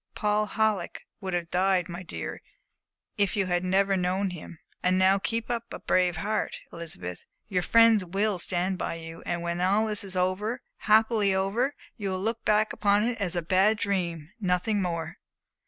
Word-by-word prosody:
Paul 210 0 +1
Halleck 215 -1 -1 0.2
would 190 -3 -3
have 170 -1 -3
died, 185 -1 +2
my 175 0 -6
dear, 85 - -6 0.8
if 200 +2 +2
you 200 -2 +1
had 175 -1 0
never 195 +2 +2
known 185 +1 0
him. 170 -1 -9 0.2
And 185 +1 +2
now 190 +1 +4
keep 230 +3 -2
up 235 0 -3
a - - -5
brave 180 -1 +1
heart, 215 +3 -2
Elizabeth. 90 - -6 0.3
Your 185 -2 +1
friends 230 +1 +5
will 195 +2 0
stand 180 +2 -1
by - - -2
you, 165 0 -9
and 175 0 -2
when 170 +1 -2
all 200 +4 +3
this 210 -2 +1
is 190 -2 -2
over 190 +7 0 0.2
happily 215 -2 +3
over, 220 +9 0 0.2
you 200 -4 -3
will 185 0 -2
look 225 +4 -2
back 215 0 +2
upon 205 0 +2
it 230 -1 -1
as 180 -3 -1
a 175 - -1
bad 190 +6 +3
dream 175 -6 -2
nothing 195 +2 +1
more." 170 -3 -3
190 Hz, 180 wpm, -27 LUFS, 180-210 Hz, 0.8 s, friends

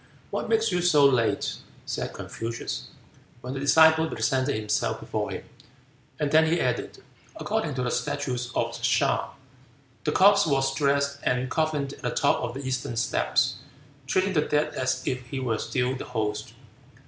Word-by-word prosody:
"What - - -3
makes 450 0 +2
you 180 - +1
so 155 -5 +5
late?" 125 -5 +2 0.3
said - - -3
Confucius, 115 - -5 0.5
when 125 +1 -5
the 135 - -4
disciple 160 +3 +5
presented 130 +4 0
himself 105 0 -1
before - - -3
him; - - -5 0.8
and 145 -1 0
then 160 +1 +5
he 170 +2 +2
added, - - -2 0.3
"According 220 - -2
to 125 - -1
the 120 - -1
statutes 125 0 -2
of 115 0 -1
Hea, 125 +3 +2 0.8
the 150 - 0
corpse 200 +2 +5
was 135 -2 +1
dressed 140 0 +1
and 125 0 0
coffined 155 -3 0
at - - -13
the - - -1
top - - +2
of 120 0 -4
the 135 - -5
eastern 125 -2 -2
steps, 120 - +1 0.5
treating 190 +7 +1
the 155 - +3
dead 150 0 0
as 130 0 -1
if 125 -1 -3
he 135 +1 -4
were 115 -4 -1
still 130 0 -1
the 130 - -6
host. 110 -3 -3
135 Hz, 165 wpm, -26 LUFS, 125-150 Hz, 0.8 s, so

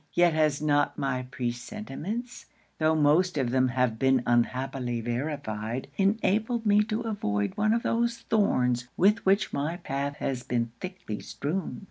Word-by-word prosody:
Yet 175 -1 +4
has 155 -2 +1
not 145 -1 +2
my 130 -2 -2
pre 125 -2 -2
sentiments, 215 - -6 0.3
tho' 155 0 +3
most 155 +4 +3
of 130 -4 0
them 130 0 +3
have 125 -3 0
been 130 -2 +3
unhappily 125 0 0
verified, 120 -1 -3
enabled 220 +4 +1
me 210 0 +5
to 215 +1 -2
avoid 105 - -1
one 215 +1 +2
of 230 +1 +1
those 235 0 +1
thorns 125 - +1
with 210 +5 +4
which 195 +1 +3
my 155 +5 -1
path 140 -2 -3
has 130 -3 -3
been 120 -2 -1
thickly 180 - -6
strewn.' 170 +7 -4
145 Hz, 150 wpm, -28 LUFS, 125-200 Hz, 0.3 s, me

